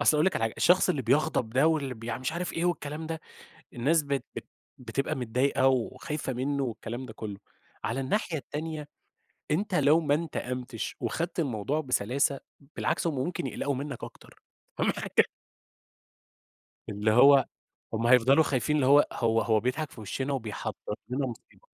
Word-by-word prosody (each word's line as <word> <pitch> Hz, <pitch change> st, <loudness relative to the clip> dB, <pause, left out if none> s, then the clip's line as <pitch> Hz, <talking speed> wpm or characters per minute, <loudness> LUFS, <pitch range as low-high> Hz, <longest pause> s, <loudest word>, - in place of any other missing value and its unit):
أصل 150 Hz, +1 st, +4 dB
هاقول 155 Hz, -, +3 dB
لِك 190 Hz, -, +2 dB
على -, -, -2 dB
حاجة، 110 Hz, -, -2 dB
الشخص 180 Hz, +1 st, +4 dB
اللي 145 Hz, -7 st, +1 dB
بيغضب 130 Hz, -2 st, +1 dB
ده 135 Hz, +6 st, +3 dB
واللي 145 Hz, -5 st, +1 dB
بيـع 115 Hz, +1 st, -5 dB
مش 130 Hz, +5 st, -2 dB
عارف 175 Hz, +1 st, -3 dB
إيه 165 Hz, -, -1 dB
والكلام 160 Hz, -2 st, -2 dB
ده، 160 Hz, -1 st, -4 dB, 0.5 s
الناس 150 Hz, +7 st, +2 dB
بت 140 Hz, -1 st, -2 dB
بت -, -, -6 dB, 0.3 s
بتبقى 125 Hz, +2 st, -2 dB
متضايقة 130 Hz, +2 st, +1 dB
وخايفة 130 Hz, +3 st, -2 dB
منه 140 Hz, +3 st, -1 dB
والكلام 120 Hz, +1 st, -5 dB
ده 110 Hz, -, -9 dB
كله. 105 Hz, -2 st, -6 dB, 0.5 s
على 115 Hz, +4 st, -1 dB
الناحية 160 Hz, +3 st, -1 dB
التانية، 150 Hz, +1 st, -5 dB, 0.6 s
أنت 190 Hz, +4 st, 0 dB
لو 150 Hz, 0 st, +5 dB
ما 145 Hz, -3 st, +1 dB
انتقمتش 125 Hz, -6 st, -4 dB
وخدت 170 Hz, +2 st, -2 dB
الموضوع 140 Hz, +1 st, -1 dB
بسلاسة، 135 Hz, +2 st, +1 dB, 0.4 s
بالعكس -, -, 0 dB
هُم 160 Hz, -, -1 dB
ممكن 135 Hz, +2 st, -2 dB
يقلقوا 140 Hz, +2 st, -2 dB
منك 140 Hz, -1 st, -5 dB
أكتر -, -, -12 dB, 0.4 s
فاهمة -, -, +2 dB
حاجة؟ -, -, +2 dB, 1.6 s
اللي 105 Hz, +1 st, 0 dB
هو، 135 Hz, +3 st, +7 dB, 0.5 s
هُم 115 Hz, +1 st, 0 dB
هيفضلوا 130 Hz, +5 st, +6 dB
خايفين 140 Hz, +2 st, 0 dB
اللي 135 Hz, -, +2 dB
هو 145 Hz, +2 st, +6 dB
هو 115 Hz, -1 st, +1 dB
هو 110 Hz, -1 st, +2 dB
بيضحك 145 Hz, +6 st, -2 dB
في -, -, -12 dB
وِشِّنا 130 Hz, +6 st, -3 dB
وبيحضّر 110 Hz, -4 st, -4 dB, 0.2 s
لنا 130 Hz, +1 st, 0 dB
مصيبة. 120 Hz, -3 st, -10 dB
135 Hz, 165 wpm, -28 LUFS, 120-150 Hz, 1.6 s, هو